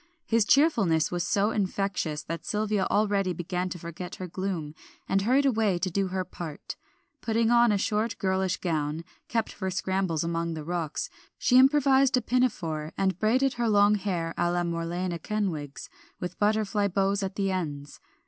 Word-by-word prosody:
His 225 -2 +2
cheerfulness 215 - +3
was 175 -1 -1
so 205 +1 +2
infectious, 190 -7 -1
that 165 +1 -5
Sylvia 210 -2 0
already 200 -3 +1
began 180 +2 -3
to 180 - -5
forget 170 +1 -7
her 185 - -6
gloom, 175 -4 -4 0.3
and 195 0 +2
hurried 260 +7 +3
away 220 -8 +2
to 185 +1 -2
do 195 +2 0
her 185 0 -2
part. 165 -4 -7 0.5
Putting 230 0 +1
on 240 -1 +5
a 205 - +2
short, 215 +3 -1
girlish 190 -1 0
gown, 155 -2 -2 0.2
kept 225 -1 -1
for 190 -2 -3
scrambles 185 -3 -1
among 165 0 -2
the 155 - -6
rocks, 165 -1 -3 0.3
she 250 0 +4
improvised 270 -1 +5
a - - +1
pinafore, 165 -12 -1
and 190 -1 0
braided 255 +5 +2
her 235 - +2
long 205 0 +5
hair 180 -5 -2
a 175 - +2
la 175 0 0
Morlena 170 +1 -2
Kenwigs, 165 -8 -3 0.3
with 180 0 -6
butterfly 210 -1 +1
bows 195 +1 +1
at 190 0 -3
the 195 -1 0
ends. 145 -6 -4
190 Hz, 165 wpm, -27 LUFS, 170-215 Hz, 0.5 s, on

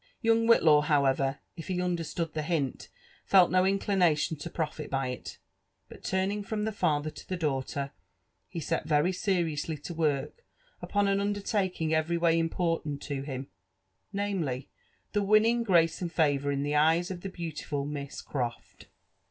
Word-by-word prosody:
Youqg 225 0 +3
Whillaw, 155 -9 +6
however, 140 -2 +2
if 165 - -8
he 185 -1 -1
understood 170 -2 -2
tlie 155 - -1
hint, 155 -6 -2 0.3
felt 185 -4 +5
no 185 0 +4
inclination 185 -6 +2
to 150 +4 -6
profit 155 -2 -4
by 135 -1 -1
it; 125 - -7 0.5
but - - -13
turning 190 +2 0
from 210 +1 -3
the 220 - -1
father 155 -6 0
to - - -13
the 185 - -1
daughter, 140 -2 -2 0.6
he 170 - -6
set 165 0 -2
very 155 +3 +3
seriously 170 -5 -1
to 150 +4 -7
work 155 - -1 0.4
upon 205 -1 +1
an 195 0 +2
undertaking 200 -5 -1
every 160 +2 +1
way 165 -1 +3
important 165 -3 -1
to 140 -2 -3
him, 135 -1 -5 0.4
— - - -48
namely, 180 -11 -2 0.4
the 205 - +1
winning 215 +4 +4
grace 170 -7 +3
and 175 -2 -2
favour 145 -4 +2
in 140 0 -1
the 145 - -1
eyesof 165 +4 +2
the 195 - -5
beautiful 155 -5 -4
Mis^ 145 -1 -6
Croft. 120 -4 -5
165 Hz, 160 wpm, -29 LUFS, 145-190 Hz, 0.6 s, Whillaw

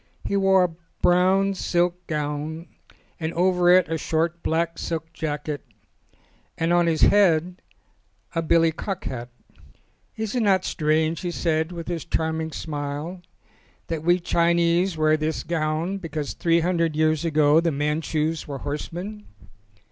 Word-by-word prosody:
He - - -1
wore 195 -1 +4
a 170 -2 -2 0.3
brown 190 +2 +4
silk 175 -1 -1
gown 150 +2 -3 0.5
and 160 -1 -2
over 180 0 +3
it 180 0 +6
a 165 0 -2
short 165 +2 -1
black 165 +1 -1
silk 160 0 -4
jacket, 150 -2 -4 0.9
and 165 +1 +1
on 175 -1 +3
his 160 -2 +1
head 180 -3 +4 0.7
a 165 - 0
billy 165 0 +3
cock 190 +3 -5
hat. 120 -1 -5 0.9
"Is 220 -1 -3
it 250 - 0
not 195 -3 +3
strange," 155 +1 0
he 180 - -2
said, 160 -1 -1
with 170 -2 -7
his 170 -3 -3
charming 160 -1 -2
smile, 150 +4 -5 0.7
"that 165 -2 -2
we 175 +3 +3
Chinese 170 +1 +2
wear 155 0 +3
this 155 +1 -2
gown 165 +3 -1
because 155 -5 -4
three 170 0 +2
hundred 165 -2 0
years 155 0 +2
ago 155 -1 +4
the 165 0 +1
Manchus 155 +2 -1
were 140 -2 -5
horse 145 +2 -5
men?" 210 +5 -7
165 Hz, 145 wpm, -24 LUFS, 155-175 Hz, 0.9 s, it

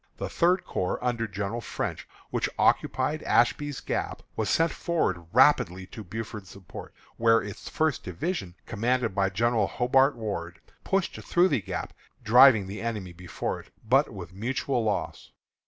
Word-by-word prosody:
The - - -4
Third 180 +2 +2
Corps, 90 - -2
under 120 -2 0
General 100 +3 -4
French, - - -4 0.2
which - - 0
occupied 145 +4 +1
Ashby's 145 +3 +1
Gap, - - -3
was - - -1
sent 165 0 +3
forward 95 - -1
rapidly 95 +2 +4
to 110 - -7
Buford's 105 0 -7
support, 100 -2 -10 0.3
where 115 0 +5
its 100 -1 -7
First 155 -4 0
Division, 95 - -4
commanded 120 -1 0
by 95 0 +1
General 110 +1 +1
Hobart 130 +3 +3
Ward, 100 -7 -5 0.2
pushed 195 -1 -1
through 175 +2 +3
the 140 - +1
Gap, - - -5 0.3
driving 120 -1 +7
the 100 +3 -6
enemy 105 -6 -4
before 90 +1 -4
it, - - -15 0.2
but 135 +5 +3
with 90 -4 -9
mutual 125 +4 -1
loss. 105 -2 -3
115 Hz, 150 wpm, -27 LUFS, 95-135 Hz, 0.3 s, driving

